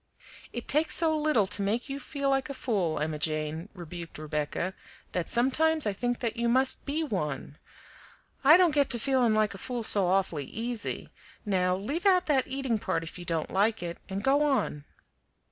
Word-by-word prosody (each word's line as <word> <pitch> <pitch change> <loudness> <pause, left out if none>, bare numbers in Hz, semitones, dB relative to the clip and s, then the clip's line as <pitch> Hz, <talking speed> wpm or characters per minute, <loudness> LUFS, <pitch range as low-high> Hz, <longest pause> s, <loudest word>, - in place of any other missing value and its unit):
"It 240 - -6
takes 305 +3 +2
so 320 -1 +3
little 300 -9 +2
to 205 +1 0
make 215 +6 -1
you 275 0 -5
feel 280 -1 -2
like 270 +1 0
a 275 - -5
fool, 195 - -1
Emma 155 0 -2
Jane," 155 +3 -2
rebuked 170 -1 -8
Rebecca, 155 +4 -3 0.4
"that 180 -2 -2
sometimes 310 +6 +2
I 205 - 0
think 245 +4 -2
that 230 -2 -1
you 235 0 +1
must 260 +3 +2
BE 305 +3 0
one 150 - -4 0.8
I 305 +5 +8
don't 355 -4 +4
get 285 -2 +2
to 240 - +3
feeling 245 -2 +2
like 215 -1 +2
a 195 - -9
fool 245 +1 -4
so 200 -3 +5
awfully 180 -6 0
easy; 230 - -4 0.4
now 180 -3 +1
leave 290 - -2
out 370 -1 +4
that 275 -4 +2
eating 265 -4 -1
part 165 -4 -1
if 165 +2 -9
you 175 - -8
don't 165 -3 -2
like 210 +1 +1
it, 170 -1 -5
and 195 +1 -4
go 275 +3 +3
on." 270 - 0
225 Hz, 190 wpm, -28 LUFS, 180-275 Hz, 0.8 s, I